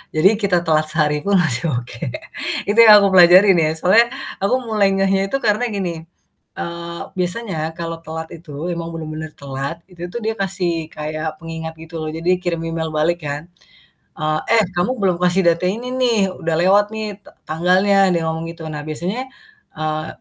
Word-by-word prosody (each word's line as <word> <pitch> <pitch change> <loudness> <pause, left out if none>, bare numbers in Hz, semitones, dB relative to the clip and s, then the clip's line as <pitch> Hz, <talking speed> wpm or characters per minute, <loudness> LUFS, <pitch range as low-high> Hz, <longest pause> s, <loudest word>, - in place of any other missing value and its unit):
Jadi 155 +5 +6
kita 180 -4 +1
telat 155 -1 +2
sehari 150 -2 +1
pun 200 0 +2
masih 155 -4 +2
oke. 120 -1 -6 0.7
Itu 215 - +2
yang 215 -3 +9
aku - - +5
pelajari 185 +2 +8
nih. 160 -1 +2
Soalnya 220 +8 +5 0.3
aku 200 +6 +2
mulai 215 -3 +2
ngehnya 195 0 +1
itu 275 - -3
karena 220 +3 +2
gini, 170 -4 -4 0.5
eee, 170 0 -5 0.2
biasanya 175 -4 -2
kalau 165 -1 -4
telat 160 0 -5
itu, 160 -2 -13 0.2
emang 170 0 -5
bener-bener 155 -1 -6
telat, 140 +2 -4 0.2
itu 175 0 -7
tuh 240 - -3
dia 225 - 0
kasih 175 -4 -1
kayak 155 +1 -4
pengingat 160 -1 -6
gitu 165 +1 -11
loh, 155 - -4
jadi 165 +2 -2
kirim 170 -2 -1
email 165 -1 -2
balik 170 +3 +1
kan, 145 +1 -3 0.8
eee, 155 0 0 0.2
"Eh - - +4
kamu 175 +8 +1
belum 185 -3 +2
kasih 180 +2 +3
data 170 +1 +2
ini 235 +5 -4
nih. 245 -4 +2 0.2
Udah 165 -1 0
lewat 200 +3 +5
nih 220 0 -3 0.2
ta - - -16 0.2
tanggalnya." 185 +5 +2 0.2
Dia 170 - +1
ngomong 160 0 -2
gitu. 165 -1 -11
Nah 150 - -4
biasanya, 180 +10 -3 0.6
eee 155 0 -2
170 Hz, 175 wpm, -19 LUFS, 160-195 Hz, 0.8 s, yang